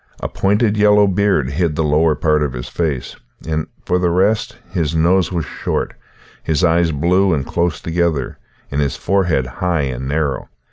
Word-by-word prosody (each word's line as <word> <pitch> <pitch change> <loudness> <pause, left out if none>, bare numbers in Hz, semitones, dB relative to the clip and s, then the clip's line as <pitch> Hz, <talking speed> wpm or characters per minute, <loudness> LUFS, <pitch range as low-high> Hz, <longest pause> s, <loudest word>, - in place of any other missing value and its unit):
A - - -3
pointed 105 +2 +1
yellow 105 0 +5
beard 95 -8 +1
hid 80 0 0
the 80 - 0
lower 75 +1 +3
part 75 -2 +1
of 75 -3 -1
his - - -6
face, 75 -7 -3 0.3
and, 80 -1 -1 0.2
for 90 - +1
the 90 -1 +1
rest, 100 +5 +1
his 80 -1 -1
nose 85 +2 +2
was 85 -4 -2
short, - - -3 0.5
his 80 +3 0
eyes 85 0 +3
blue 90 +5 +2
and 70 -3 -2
close 85 0 -1
together, 85 -4 -1 0.3
and 70 +1 0
his 70 -2 -1
forehead 90 -9 +1
high 85 +6 -1
and 65 -1 -3
narrow. 70 -2 -2
80 Hz, 175 wpm, -18 LUFS, 75-90 Hz, 0.5 s, yellow